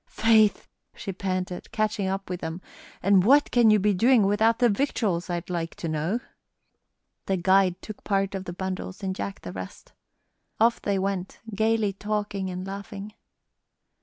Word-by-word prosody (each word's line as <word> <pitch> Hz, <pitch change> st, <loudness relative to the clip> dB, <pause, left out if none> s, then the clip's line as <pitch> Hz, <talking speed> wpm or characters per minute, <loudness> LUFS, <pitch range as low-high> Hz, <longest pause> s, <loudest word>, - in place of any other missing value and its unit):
"Faith!" 220 Hz, -2 st, +3 dB, 0.3 s
she 195 Hz, -, -5 dB
panted, 185 Hz, -1 st, -4 dB
catching 215 Hz, -2 st, 0 dB
up 195 Hz, +1 st, -3 dB
with 180 Hz, -1 st, -4 dB
them, 165 Hz, +1 st, -5 dB, 0.4 s
"and 195 Hz, -2 st, +5 dB
what 285 Hz, +7 st, +5 dB
can 240 Hz, -2 st, +5 dB
you 215 Hz, -, +6 dB
be 205 Hz, +1 st, +2 dB
doing 230 Hz, +3 st, +4 dB
without 220 Hz, +3 st, +3 dB
the 245 Hz, -, +4 dB
victuals, 205 Hz, -7 st, 0 dB
I'd 175 Hz, 0 st, -3 dB
like 165 Hz, -1 st, -3 dB
to 170 Hz, -, -5 dB
know?" 160 Hz, +8 st, -1 dB, 1.1 s
The 195 Hz, -, +1 dB
guide 185 Hz, 0 st, +3 dB
took 215 Hz, -, -9 dB
part 195 Hz, -1 st, 0 dB
of 190 Hz, -1 st, -4 dB
the 175 Hz, -, -5 dB
bundles 190 Hz, +1 st, -5 dB
and 190 Hz, -1 st, -2 dB
Jack 100 Hz, -, -5 dB
the 90 Hz, -, -7 dB
rest. 95 Hz, 0 st, -9 dB, 0.7 s
Off 230 Hz, +1 st, +3 dB
they 200 Hz, -1 st, 0 dB
went 190 Hz, -1 st, -3 dB
gayly 220 Hz, -1 st, +1 dB
talking 205 Hz, -1 st, -3 dB
and 185 Hz, 0 st, -5 dB
laughing. 200 Hz, +1 st, -7 dB
195 Hz, 165 wpm, -26 LUFS, 185-215 Hz, 1.1 s, you